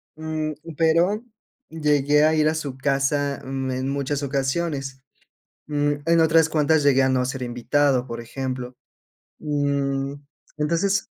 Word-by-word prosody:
Mm, 155 -1 -3 0.2
pero 170 +7 +2 0.5
llegué 150 -2 +2
a 155 +1 +4
ir 155 0 +3
a 160 - -1
su 140 -4 -4
casa, 140 +1 0
mm, 135 0 -3
en 130 +1 -2
muchas 140 +1 -2
ocasiones. 135 -1 -2 0.6
Mm, 145 -1 +1
en 165 0 +4
otras 160 0 +4
cuantas 155 0 +2
llegué 135 -2 +4
a - - +3
no 130 -1 +2
ser 130 0 -3
invitado, 125 +2 +1
por 115 -1 -6
ejemplo. 125 +1 -5 0.6
Mm, 140 -2 -1 0.4
entonces 170 +6 +1
145 Hz, 135 wpm, -23 LUFS, 135-155 Hz, 0.6 s, a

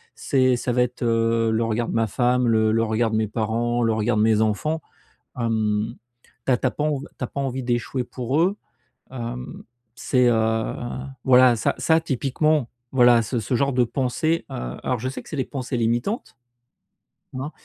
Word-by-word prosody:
c'est 130 -2 +2
ça 125 - -2
va 125 +1 +3
être, 125 0 -5
heu, 115 0 +2
le 110 +1 +1
regard 115 +1 -1
de - - -3
ma 115 0 +2
femme, 125 +3 +1
le 110 -1 +3
le 115 +1 +2
regard 110 +1 +1
de - - 0
mes 110 0 +1
parents, 115 +2 -1
le 115 -1 +2
regard 110 +1 0
de - - +3
mes 110 -1 +3
enfants. 110 +9 0 0.6
Hem, 110 -1 0 0.5
tu - - +1
as - - +4
tu - - 0
as - - +2
pas - - -3
env 150 -2 0 0.2
tu - - -3
as - - -1
pas 140 - -5
envie 135 -1 -2
d'échouer 120 +1 -1
pour 130 +4 -2
eux. 190 +4 +1 0.6
Hem, 125 0 -6 0.3
c'est, 125 +1 +2
heu, 110 -1 +1 0.5
voilà, 125 -1 +6
ça 110 - 0
ça 160 0 +3
typiquement, 145 -1 0 0.2
voilà, 120 -2 +5
ce 120 +3 -2
ce 115 +4 -2
genre 140 +2 +1
de 125 0 +3
pensées, 140 +7 -1
heu, - - -5
alors 125 - -1
je 130 +4 -2
sais 135 - -6
que - - -15
c'est - - -5
les 130 - 0
pensées 130 0 -3
limitantes, 120 - -1 1.0
hein. 145 +4 -4
120 Hz, 195 wpm, -23 LUFS, 115-130 Hz, 1.0 s, voilà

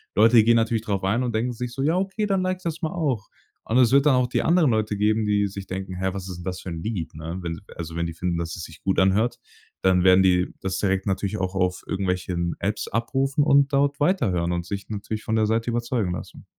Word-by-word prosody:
Leute 110 +1 +6
gehen 115 +1 +4
natürlich 115 -1 +1
drauf 100 -3 -2
ein 105 +6 +1
und 120 -2 -2
denken 120 +3 0
sich 120 +1 -5
so: 135 - -4
„Ja 160 +4 +2
okay, 195 +3 -1
dann 195 -2 +1
like 185 0 -1
ich 185 - -22
das 165 0 -4
mal 160 -1 -1
auch.“ 140 - -1 0.4
Und 115 - +1
es 125 -2 +5
wird 140 +1 +5
dann 150 - +5
auch 125 -1 +2
die 125 - 0
anderen 165 -5 +4
Leute 110 -1 0
geben, 110 +1 +2
die 105 -1 +2
sich 100 -1 -8
denken: 95 0 -5
„Hä, 95 +1 -1
was 95 -1 -6
ist 90 - -6
denn 90 - -9
das 90 -1 -4
für - - -7
'n 85 -1 -5
Lied,“ 100 -7 -4
ne? 80 +3 -5
Wenn 85 -1 -4 0.2
also 80 -1 -6
wenn 85 - 0
die 85 - -4
finden, 85 +1 -2
dass 85 0 -4
es 85 - -7
sich 80 -1 -11
gut 95 - 0
anhört, 100 +5 +2 0.4
dann 95 -1 +3
werden 95 0 +6
die 90 -1 +2
das 95 -1 -2
direkt 95 -1 0
natürlich 100 +2 -1
auch 95 0 -2
auf 90 -1 0
irgendwelchen 90 -2 -2
Apps 100 +2 -2
abrufen 135 +6 0
und 140 0 +4
dort 140 +1 +2
weiterhören 105 - +1
und 85 0 -2
sich 100 +2 -5
natürlich 110 +1 -4
von 110 - -1
der 110 -1 +3
Seite 115 +2 0
überzeugen 120 -5 -1
lassen. - - -8
105 Hz, 255 wpm, -24 LUFS, 90-125 Hz, 0.4 s, Leute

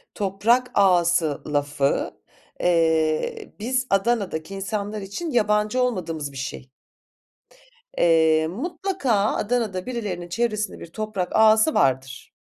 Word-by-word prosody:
toprak 210 +6 +1
ağası 175 -5 +3
lafı, 145 -1 0 0.5
eee, 165 - +1
biz 255 +3 -1
Adana'daki 195 -5 0
insanlar 205 +2 -4
için 245 - -5
yabancı 210 +1 +1
olmadığımız 165 - -2
bir 135 - -10
şey. 135 -1 -6 1.3
Eee, 160 -1 +4
mutlaka 330 - -3 0.2
Adana'da 210 -5 -1
birilerinin 200 -8 -4
çevresinde 215 +1 -2
bir - - -9
toprak 215 -4 -3
ağası 220 +6 +5
vardır. 130 -1 0
195 Hz, 100 wpm, -23 LUFS, 160-235 Hz, 1.3 s, ağası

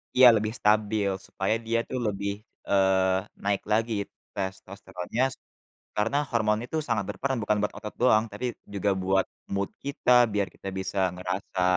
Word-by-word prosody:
Iya, 130 0 +9
lebih 110 +1 -1
stabil 105 -1 +2 0.2
supaya 95 +3 0
dia 115 +1 +1
tuh 130 - -2
lebih, 100 -1 -1 0.4
eee, 95 -1 +4 0.3
naik 100 0 +1
lagi 115 +2 +2 0.4
testosteronnya 95 +2 -4 0.7
karena 115 +7 +1
hormon 110 -3 +2
itu 160 - -3
sangat 110 -5 0
berperan 130 +6 -1
bukan 105 0 +1
buat 105 - -1
otot 105 - -7
doang 110 -3 +5
tapi 105 +5 -4 0.3
juga 100 0 0
buat 95 0 +2 0.3
mood 100 0 0
kita 140 -2 0 0.2
biar 100 -2 +1
kita - - -9
bisa 95 +1 -2
ngerasa, 90 +1 -3
100 Hz, 150 wpm, -27 LUFS, 95-110 Hz, 0.7 s, Iya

